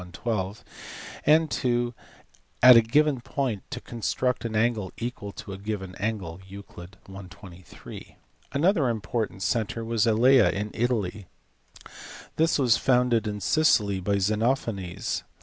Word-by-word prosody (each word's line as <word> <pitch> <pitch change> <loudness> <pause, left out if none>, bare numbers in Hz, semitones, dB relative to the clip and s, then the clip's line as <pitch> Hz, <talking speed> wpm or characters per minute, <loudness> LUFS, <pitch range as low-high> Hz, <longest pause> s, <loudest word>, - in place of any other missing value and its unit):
12), 105 -2 -3 0.6
and 155 +1 +3
(ii) 120 -1 0 0.7
at 125 -1 +10
a 115 - +8
given 140 +3 +2
point 130 -5 -3
to - - -5
construct 125 +2 -2
an 115 -2 -4
angle 110 -4 0
equal 115 -4 -5
to 100 - -9
a 95 - -8
given 100 -3 -5
angle 95 -5 -3
(Euc. 95 -2 -11 0.2
i. 100 - -8
23). 90 -1 -12 0.4
Another 155 -2 +2
important 110 -2 -3
centre 115 0 -1
was 115 0 +1
at 110 - +3
Elea 125 +1 +5
in 105 +1 -3
Italy. 110 -5 -2 1.1
This 160 +1 +2
was 125 -5 +3
founded 125 -3 +2
in 105 -1 -4
Sicily 105 - +2
by 100 +2 0
Xenophanes. 105 -2 -1
110 Hz, 130 wpm, -26 LUFS, 100-125 Hz, 1.1 s, at